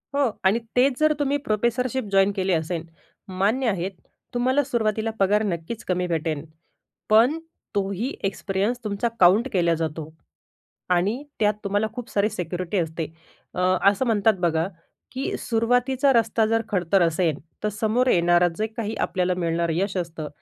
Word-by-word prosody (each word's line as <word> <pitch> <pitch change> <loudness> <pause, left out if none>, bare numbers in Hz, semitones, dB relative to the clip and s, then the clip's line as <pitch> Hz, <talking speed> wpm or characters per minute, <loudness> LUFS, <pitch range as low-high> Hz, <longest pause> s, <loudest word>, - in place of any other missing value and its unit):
हो. 280 -5 +2
आणि 195 +4 +3 0.2
तेच 255 +1 +3
जर 310 0 +4
तुम्ही 285 0 +1
प्रोफेसरशिप 240 +4 0
जॉइन 195 +1 +4
केली 190 -1 0
असेल, 160 0 -1 0.4
मान्य 205 +8 0
आहे 190 -2 -1 0.4
तुम्हाला 260 +4 +2
सुरुवातीला 225 -4 -1
पगार 205 +2 +3
नक्कीच 190 +3 -4
कमी 180 -1 0
भेटेन. 160 -3 -2 0.6
पण 235 +9 +5 0.4
तोही 200 +6 -1
एक्सपिरियन्स 195 +4 -1
तुमचा 210 +2 -1
काउंट 190 +8 +5
केला 170 -3 +3
जातो 160 -1 -4 0.9
आणि 205 +10 0 0.2
त्यात 210 -1 +3
तुम्हाला 205 +2 0
खूप 245 -1 -7
सारी 205 +1 +1
सिक्युरिटी 180 +1 -3
असते. 160 -1 -2 0.5
अ, - - -2 0.3
असं 205 +6 0
म्हणतात 220 -2 +3
बघा, 165 -1 +1 0.4
की 260 +2 -3
सुरुवातीचा 245 +4 +2
रस्ता 225 -1 +2
जर 225 +1 +2
खडतर 190 -1 +2
असेल 165 -2 +1 0.3
तर 210 - +1
समोर 220 +4 0
येणारं 175 -3 +4
जे 215 - 0
काही 220 0 -4
आपल्याला 180 -1 0
मिळणारं 170 -1 0
यश 195 +2 -1
असतं, 165 -3 -4
200 Hz, 145 wpm, -24 LUFS, 175-235 Hz, 0.9 s, पण